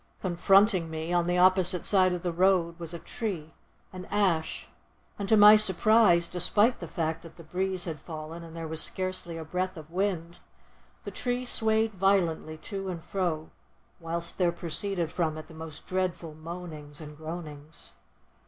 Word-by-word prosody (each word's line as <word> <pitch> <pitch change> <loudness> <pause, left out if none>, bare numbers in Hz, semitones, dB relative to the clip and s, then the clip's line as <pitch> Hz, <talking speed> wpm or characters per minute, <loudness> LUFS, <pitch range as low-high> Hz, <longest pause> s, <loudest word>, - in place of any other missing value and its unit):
Confronting 185 0 +3
me, 160 +2 -4
on 175 -1 +2
the 175 0 +1
opposite 185 -1 +4
side 185 -2 +4
of 180 0 -3
the 175 - -1
road, 175 -1 +2
was 170 -1 -6
a 170 - -5
tree, 170 -5 -5 0.4
an 185 0 -7
ash, 185 -6 0 0.5
and 200 0 -3
to 220 - +6
my 210 +1 +10
surprise, 210 -3 +5
despite 205 +7 +2
the 170 - -6
fact 160 0 -2
that 165 - -13
the 170 - -12
breeze 185 +2 -2
had 160 -4 -5
fallen 160 +2 -8
and 165 0 -11
there 165 -1 -5
was 160 0 -2
scarcely 185 -3 -3
a 160 - -6
breath 185 +3 -3
of 155 0 -11
wind, 175 -2 -2 0.6
the - - -6
tree 245 0 -2
swayed 220 -2 +3
violently 175 -5 +1
to 195 +3 -6
and 170 -3 -6
fro, 175 -4 -2 0.5
whilst 170 +1 -4
there 175 -2 +3
proceeded 170 0 -1
from 160 -3 -1
it 155 - -8
the 160 - -15
most 160 -1 -9
dreadful 180 -3 -2
moanings 155 -2 -8
and 150 -1 -9
groanings. 155 -1 -9
175 Hz, 170 wpm, -28 LUFS, 160-190 Hz, 0.6 s, my